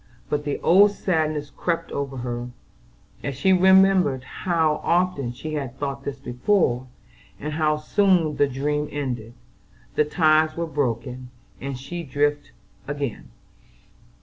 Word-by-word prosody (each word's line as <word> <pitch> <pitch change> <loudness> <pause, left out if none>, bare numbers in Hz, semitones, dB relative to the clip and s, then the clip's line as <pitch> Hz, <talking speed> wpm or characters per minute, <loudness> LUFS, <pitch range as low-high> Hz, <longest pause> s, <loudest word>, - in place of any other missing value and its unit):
But 150 0 -1
the 145 - -2
old 200 +4 +6
sadness 155 -7 -1
crept 170 -1 -2
over 140 -1 -3
her, 120 0 -4 0.7
as 140 - -3
she 190 +8 +3
remembered 190 -7 +5
how 160 0 0
often 170 -8 +1
she 155 +6 -7
had 135 -4 -4
thought 140 -1 -4
this 140 -1 -4
before, 130 -1 +1 0.5
and 150 +1 -4
how 155 -1 +1
soon 175 -1 +2
the 145 - +4
dream 150 +3 -1
ended, 125 -5 -4 0.6
the - - +3
ties 155 0 +3
were 170 - -1
broken, 125 -4 -3 0.3
and 135 -1 -4
she 140 +7 -6
adrift 145 0 -1 0.4
again. 145 -5 -4
145 Hz, 130 wpm, -24 LUFS, 135-165 Hz, 0.7 s, old